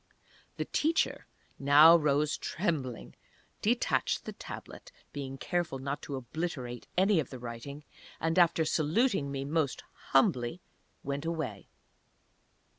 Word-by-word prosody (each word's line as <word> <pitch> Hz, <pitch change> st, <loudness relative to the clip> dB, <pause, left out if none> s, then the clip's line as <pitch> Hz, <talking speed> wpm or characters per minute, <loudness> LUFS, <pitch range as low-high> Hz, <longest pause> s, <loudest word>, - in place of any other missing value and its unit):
The -, -, -2 dB
Teacher 320 Hz, +2 st, 0 dB, 0.3 s
now 145 Hz, +4 st, +8 dB
rose 150 Hz, -1 st, +2 dB
trembling, 150 Hz, -, -3 dB, 0.5 s
detached 235 Hz, +4 st, +1 dB
the -, -, -5 dB
Tablet -, -, -9 dB, 0.2 s
(being 135 Hz, -2 st, -5 dB
careful 175 Hz, -3 st, -2 dB
not 140 Hz, +2 st, -4 dB
to 140 Hz, -, -5 dB
obliterate 130 Hz, -2 st, -5 dB
any 190 Hz, 0 st, +4 dB
of 145 Hz, -, -2 dB
the 130 Hz, -, -7 dB
writing), 125 Hz, +5 st, -7 dB, 0.4 s
and, 165 Hz, +2 st, +1 dB
after 170 Hz, -2 st, +4 dB
saluting 155 Hz, -, +1 dB
me 135 Hz, 0 st, -3 dB
most 150 Hz, -2 st, -1 dB, 0.3 s
humbly, 130 Hz, +2 st, +2 dB, 0.4 s
went 140 Hz, +2 st, -3 dB
away. 155 Hz, -12 st, -4 dB
145 Hz, 115 wpm, -30 LUFS, 135-170 Hz, 0.5 s, now